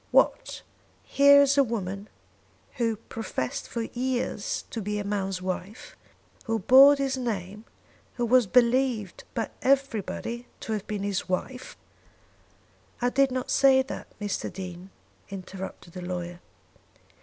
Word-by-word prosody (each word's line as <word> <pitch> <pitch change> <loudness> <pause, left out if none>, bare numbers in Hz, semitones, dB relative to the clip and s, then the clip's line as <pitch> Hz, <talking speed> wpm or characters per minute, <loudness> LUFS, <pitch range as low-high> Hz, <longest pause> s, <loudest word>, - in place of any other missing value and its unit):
"What! - - +2 0.4
Here 280 0 +6
is 280 0 +3
a - - +7
woman 200 -4 -4 0.7
who 230 -2 +1
professed 215 - -5
for 235 - -3
years 255 - -2
to 225 - -4
be 210 +1 -2
a 205 - -2
man's 195 -2 -2
wife, 185 +4 -5 0.5
who 225 -1 0
bore 265 +7 +8
his 270 -1 -1
name, 210 -3 -4 0.5
who 240 - 0
was 245 -1 +4
believed 240 -3 +2
by 225 - -2
everybody 245 -2 0
to 220 - -3
have 210 -2 -4
been 205 -2 -3
his 200 -2 -2
wife 250 +8 -4 0.6
" - - -34
"I 245 0 +1
did 275 +1 +3
not 255 0 -3
say 265 -1 +5
that, 265 - -7
Mr. 205 -1 -3
Dean," 185 -1 -8 0.4
interrupted 190 -2 -8
the 180 - -7
lawyer. 175 -1 -5
225 Hz, 135 wpm, -27 LUFS, 195-255 Hz, 0.7 s, bore